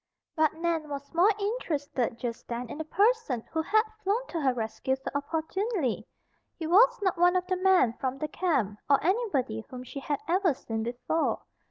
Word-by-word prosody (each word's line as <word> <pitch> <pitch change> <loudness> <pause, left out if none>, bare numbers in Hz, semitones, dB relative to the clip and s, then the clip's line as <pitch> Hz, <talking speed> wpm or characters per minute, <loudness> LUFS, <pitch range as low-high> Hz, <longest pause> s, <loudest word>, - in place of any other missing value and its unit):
But 315 -1 +2
Nan 325 -2 -1
was 280 +1 -6
more 350 +5 +5
interested 300 - -2
just 235 -2 -5
then 235 0 -4
in - - -7
the - - -1
person 400 - +2
who 320 - 0
had 435 +7 +3 0.2
flown 425 +6 +1
to 330 - -2
her 270 -2 +3
rescue 245 +2 -2
so 265 - -6
opportunely. 320 - -1 0.5
He 325 - -4
was 475 +9 +6
not 375 -3 +1
one 355 +1 +5
of 365 0 +1
the 370 0 -1
men 365 -11 +4
from 265 0 -2
the 305 - -2
camp, 275 - 0
or 280 - +6
anybody 305 - 0
whom 250 -1 -7
she 265 +3 -7
had 285 +1 -2
ever 350 -3 +2
seen 225 -4 -4
before. 245 +8 -1
315 Hz, 185 wpm, -28 LUFS, 260-370 Hz, 0.5 s, was